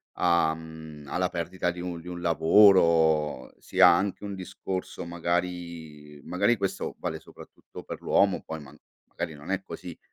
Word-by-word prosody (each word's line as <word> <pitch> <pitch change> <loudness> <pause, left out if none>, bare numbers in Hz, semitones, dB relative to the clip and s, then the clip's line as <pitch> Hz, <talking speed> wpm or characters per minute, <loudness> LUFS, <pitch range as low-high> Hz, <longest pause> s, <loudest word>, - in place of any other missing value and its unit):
a 85 -2 +3
mhmm, 80 -2 -10
alla 90 +6 -1
perdita 90 +1 -2
di 90 - -9
un 85 -2 -5
di 90 - -9
un 90 0 -6
lavoro, 80 -5 +4
sia 90 - +5
anche 95 +3 +2
un 100 -1 -5
discorso 95 -1 -5
magari 85 -4 -4
magari 115 +6 +2
questo 95 0 -3
vale - - -4
soprattutto - - -13
per - - -8
l'uomo, - - +2
poi 80 0 -6
man 75 +1 -13 0.3
magari 80 - -5
non 75 +6 -8
è 95 0 0
così, 90 -3 -9
85 Hz, 155 wpm, -27 LUFS, 80-90 Hz, 0.3 s, sia